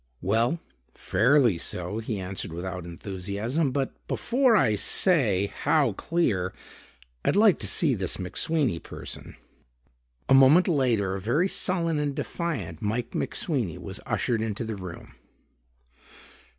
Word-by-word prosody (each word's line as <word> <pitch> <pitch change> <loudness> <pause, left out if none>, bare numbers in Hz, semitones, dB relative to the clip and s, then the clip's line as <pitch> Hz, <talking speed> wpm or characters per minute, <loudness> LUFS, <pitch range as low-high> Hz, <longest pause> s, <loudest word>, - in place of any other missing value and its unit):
"Well, 115 - +1 0.4
fairly 120 - +3
so," 90 +5 -3
he 110 -2 -4
answered 95 -2 -5
without 90 +1 -5
enthusiasm. 100 - -3
"But 135 0 -1
before 250 -1 +2
I 125 - +4
say 105 - +2
how 150 -4 +3
clear, 100 - -1 0.7
I'd - - +2
like 210 -2 +5
to - - -2
see 155 -6 +2
this 95 -6 -1
McSweeney 115 - -1
person." - - -9 0.9
A - - +4
moment 135 +7 +7
later 120 - +1
a 95 - -4
very 150 - +1
sullen 170 -5 0
and 145 -2 -1
defiant 115 - -4
Mike 110 +3 -2
McSweeney 125 - -2
was - - -7
ushered 115 -2 0
into 110 0 -2
the 110 -1 -4
room. 90 -4 -9
115 Hz, 125 wpm, -26 LUFS, 95-155 Hz, 0.9 s, moment